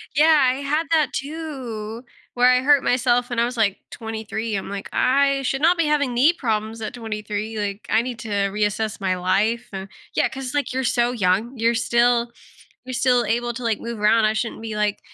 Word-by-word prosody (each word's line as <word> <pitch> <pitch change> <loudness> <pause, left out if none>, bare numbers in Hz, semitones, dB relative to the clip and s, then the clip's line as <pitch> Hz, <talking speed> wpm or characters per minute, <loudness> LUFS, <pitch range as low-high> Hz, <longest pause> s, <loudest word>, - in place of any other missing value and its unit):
Yeah, 310 +1 +6
I - - -2
had 290 +4 -1
that 310 -3 +2
too, 260 -7 -5 0.3
where 245 +1 +4
I 250 0 +4
hurt 285 0 +4
myself 245 0 +2
when 240 -1 -2
I 235 - +3
was, 245 0 -5
like, 205 -3 +2
23. 220 -1 -4
I'm 195 - -4
like, 200 -1 -6
"I 275 +1 +2
should 270 +2 -1
not 340 +2 +4
be 335 - +2
having 285 -4 +1
knee 280 +8 +4
problems 225 -5 -2
at 215 - -4
23. 215 -1 -5
Like, 200 0 -4
I 220 - +3
need 245 -1 -6
to 225 - -7 0.2
reassess 210 +1 -1
my 185 -1 +1
life 210 +6 0
and" 190 0 -5 0.3
Yeah, - - +3
'cause, 265 0 -6
like, 285 -3 -1
you're 260 0 -1
so 240 0 +1
young, 220 +3 0
you're 230 +1 +2
still 235 +1 +2 0.5
you're 255 - -6
still 245 -1 +3
able 240 +2 -1
to, 250 - -7
like, 225 -2 0
move 235 -2 -6
around, 215 +1 +4
"I 215 - +2
shouldn't 225 0 -3
be 220 -1 -5
like" 210 -1 0
235 Hz, 205 wpm, -22 LUFS, 215-255 Hz, 0.5 s, Yeah